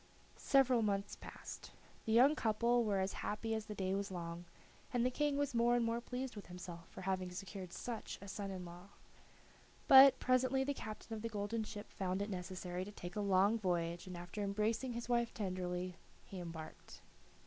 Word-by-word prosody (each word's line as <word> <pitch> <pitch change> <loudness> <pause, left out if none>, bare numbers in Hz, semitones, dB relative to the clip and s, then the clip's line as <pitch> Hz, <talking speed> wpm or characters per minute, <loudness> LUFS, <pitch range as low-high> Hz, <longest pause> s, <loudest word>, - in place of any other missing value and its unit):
Several 260 -3 +4
months 200 -1 0
passed. - - -9 0.4
The 220 - -1
young 255 +6 +7
couple 235 0 +2
were 205 -3 +1
as 190 +1 0
happy 225 +2 -2
as 220 -1 -3
the 210 - -5
day 190 -1 -1
was 200 0 -1
long, 170 -1 -5 0.5
and 245 -1 +2
the 255 - +2
King 295 +1 +1
was 285 -1 0
more 235 +1 +4
and 240 -1 +2
more 230 +1 0
pleased 250 +1 -4
with 205 - -8
himself 175 -1 -8
for - - -9
having 185 -1 -1
secured 185 0 -7
such 230 +3 -5
a 200 - -10
son 200 0 -4
in 185 -2 -5
law. 175 +2 -10 1.0
But, 270 -1 +10
presently, 255 +1 +2
the 285 +1 0
captain 220 -2 -7
of 215 - -6
the 230 - -2
golden 215 +1 -2
ship 210 -1 -8
found 190 +1 -1
it 205 - -5
necessary 180 0 -4
to 205 - -8
take 175 -3 -8
a 210 - 0
long 200 +3 +4
voyage, 175 -2 -1
and 180 -1 -6
after 175 +4 -6
embracing 215 +5 0
his 235 0 -4
wife 235 -1 +1
tenderly 180 -2 -3 0.3
he 190 - -7
embarked. 165 -2 -8
205 Hz, 190 wpm, -37 LUFS, 185-235 Hz, 1.0 s, But